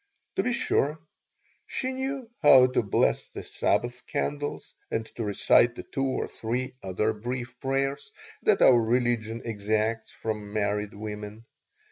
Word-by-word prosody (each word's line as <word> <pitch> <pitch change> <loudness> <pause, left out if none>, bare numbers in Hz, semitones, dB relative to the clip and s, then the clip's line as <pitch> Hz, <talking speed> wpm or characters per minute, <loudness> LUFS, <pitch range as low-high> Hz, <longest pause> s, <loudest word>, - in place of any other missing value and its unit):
To - - +4
be 250 - 0
sure, 150 -9 +1 0.7
she 260 - -2
knew 265 -1 -3
how 135 -4 +8
to 125 - +1
bless 100 -4 +1
the - - -8
Sabbath 125 +1 -1
candles 145 0 -3 0.2
and 110 - -1
to 115 - -3
recite 115 +3 +4
the - - -7
two 135 - -3
or 135 -1 -1
three 125 +3 -3
other 95 +4 0
brief 125 +3 -5
prayers 135 - -1 0.3
that 435 - +4
our 120 -2 +7
religion 115 -1 0
exacts 110 +1 -1
from 105 -2 -5
married 105 -1 -1
women. 105 +1 -7
120 Hz, 140 wpm, -27 LUFS, 110-135 Hz, 0.7 s, how